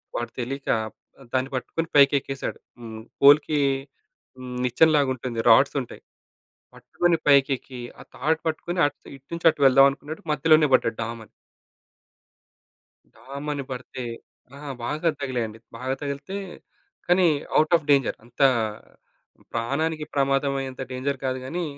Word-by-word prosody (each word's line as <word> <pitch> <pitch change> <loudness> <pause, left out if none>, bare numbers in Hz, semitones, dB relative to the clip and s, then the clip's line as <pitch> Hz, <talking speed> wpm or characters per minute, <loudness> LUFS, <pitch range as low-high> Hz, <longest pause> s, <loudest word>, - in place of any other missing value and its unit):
వాడు 120 0 -3
తెలియక 135 +3 -5
ఆహ్, 110 0 -7 0.4
దాన్ని 130 +1 0
పట్టుకొని 165 +6 -3
పైకి 140 -1 +7
ఎక్కేసాడు. 135 0 -6 0.2
హ్మ్. 110 -2 -8 0.2
పోల్‌కి 145 +2 +6 0.8
హ్మ్. 130 -1 -8
నిచ్చెన 125 +6 +4
లాగా 140 -2 +2
ఉంటుంది. 120 -2 -5
రాడ్స్ 135 +6 +5
ఉంటయి. 125 - -10 0.7
పట్టుకొని 175 -1 0
పైకి 140 -1 +5
ఎక్కి, 125 0 -11 0.2
ఆ - - -9
తాడు 160 +4 0
పట్టుకొని 175 +3 -2
అట్ 145 -1 -6 0.2
ఇటు 135 0 -16
నుంచి 170 0 -3
అటు 150 - -11
వెళ్దాం 135 +1 +7
అనుకున్నాడు. 150 +3 -8
మధ్యలోనే 155 0 +4
పడ్డాడు 115 -3 +2
డామ్ 115 +1 -5
అని. - - -22 1.8
డామ్ 140 +2 -9
అని 140 -1 -4
పడితే 125 0 -6 0.5
ఆ! - - -11 0.3
బాగా 155 +7 0
తగిలాయండి. 120 -5 -3 0.2
బాగా 130 +2 -2
తగిలితే 140 +6 -5 0.7
కానీ 180 +1 +4 0.3
ఔట్ 155 +2 +2
ఆఫ్ 160 -3 -1
డేంజర్. 140 -3 +2
అంత 120 +3 -9 1.1
ప్రాణానికి 150 +7 -1
ప్రమాదం 140 0 +1
అయ్యేంత 130 -1 -6
డేంజర్ 135 +2 -2
కాదు 130 0 -1
గాని, 175 +7 -3
140 Hz, 140 wpm, -24 LUFS, 125-150 Hz, 1.8 s, పైకి